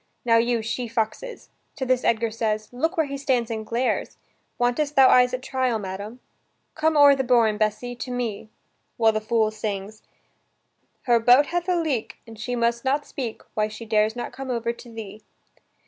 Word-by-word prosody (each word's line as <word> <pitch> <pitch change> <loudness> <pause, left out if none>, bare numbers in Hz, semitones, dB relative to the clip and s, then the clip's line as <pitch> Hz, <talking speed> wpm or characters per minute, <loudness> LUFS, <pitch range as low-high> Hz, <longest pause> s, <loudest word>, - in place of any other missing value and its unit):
Now, 230 -1 +5
you 235 0 +1
she 235 +2 -3
foxes." 230 - -4 0.2
To 275 -4 -3
this 255 -1 +1
Edgar 230 0 +1
says: 215 -1 -2
"Look 320 +9 -1
where 320 - +3
he 280 0 -5
stands 250 -4 0
and 220 -1 -3
glares! 235 +4 -2 0.4
Wantest 265 +5 0
thou 265 -1 +7
eyes 250 0 +5
at 255 0 -4
trial, 260 -3 0
madam?" 205 +4 -7 0.5
"Come 315 0 +1
o'er 285 -1 +8
the 265 - -1
bourn, 235 -4 +3
Bessy, 215 +3 -1
to 250 - -7
me, 230 -4 -4 0.2
" - - -47
while 225 -2 +4
the 215 0 -2
fool 220 -1 +1
sings: 215 0 -5 1.0
"Her 240 -2 +3
boat 245 +5 +6
hath 350 +2 -2
a 360 - +3
leak 285 -9 -2
And 225 -2 -13
she 245 +2 -3
must 235 0 0
not 280 +2 0
speak 240 -5 -6
Why 215 0 +1
she 215 +2 -9
dares 215 0 +1
not 240 - -5
come 270 0 -7
over 235 -1 -1
to 235 0 -13
thee." 215 -2 -9
235 Hz, 190 wpm, -24 LUFS, 220-260 Hz, 1.0 s, o'er